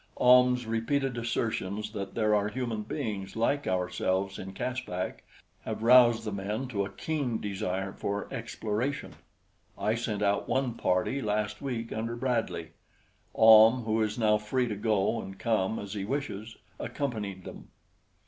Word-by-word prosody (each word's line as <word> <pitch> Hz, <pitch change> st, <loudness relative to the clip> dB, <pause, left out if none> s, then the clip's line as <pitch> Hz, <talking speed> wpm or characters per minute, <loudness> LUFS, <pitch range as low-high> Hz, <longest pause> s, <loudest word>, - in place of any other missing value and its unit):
Ahm's 125 Hz, 0 st, +5 dB
repeated 125 Hz, +4 st, 0 dB
assertions 110 Hz, -3 st, -2 dB
that 100 Hz, -3 st, -6 dB
there 110 Hz, -2 st, +2 dB
are 105 Hz, -1 st, +2 dB
human 115 Hz, -2 st, -3 dB
beings 105 Hz, -5 st, -4 dB
like 140 Hz, +6 st, 0 dB
ourselves 95 Hz, +1 st, -1 dB
in 95 Hz, -, -6 dB
Caspak 110 Hz, -5 st, -4 dB, 0.4 s
have -, -, -4 dB
roused 120 Hz, -1 st, +6 dB
the 105 Hz, -, -2 dB
men 105 Hz, +6 st, -3 dB
to 100 Hz, -5 st, -1 dB
a 100 Hz, -, -4 dB
keen 130 Hz, +1 st, -2 dB
desire 95 Hz, -1 st, -3 dB
for 100 Hz, 0 st, -3 dB
exploration. 115 Hz, +3 st, -3 dB, 0.6 s
I 105 Hz, +2 st, +1 dB
sent 110 Hz, -3 st, -2 dB
out 100 Hz, 0 st, +1 dB
one 130 Hz, -3 st, +1 dB
party 115 Hz, +6 st, 0 dB
last 105 Hz, -2 st, -1 dB
week 120 Hz, -5 st, -3 dB
under 115 Hz, +2 st, -3 dB
Bradley. 120 Hz, -9 st, -2 dB, 0.6 s
Ahm, 110 Hz, +2 st, +8 dB
who 110 Hz, 0 st, 0 dB
is 110 Hz, 0 st, -1 dB
now 105 Hz, -2 st, +3 dB
free 125 Hz, +4 st, 0 dB
to 105 Hz, -, -2 dB
go 105 Hz, +1 st, +1 dB
and 95 Hz, 0 st, -9 dB
come 110 Hz, -2 st, 0 dB
as 100 Hz, 0 st, -6 dB
he 100 Hz, -2 st, -3 dB
wishes, 110 Hz, -3 st, -4 dB, 0.2 s
accompanied 105 Hz, -9 st, -4 dB
them. -, -, -10 dB
110 Hz, 150 wpm, -29 LUFS, 100-120 Hz, 0.6 s, Ahm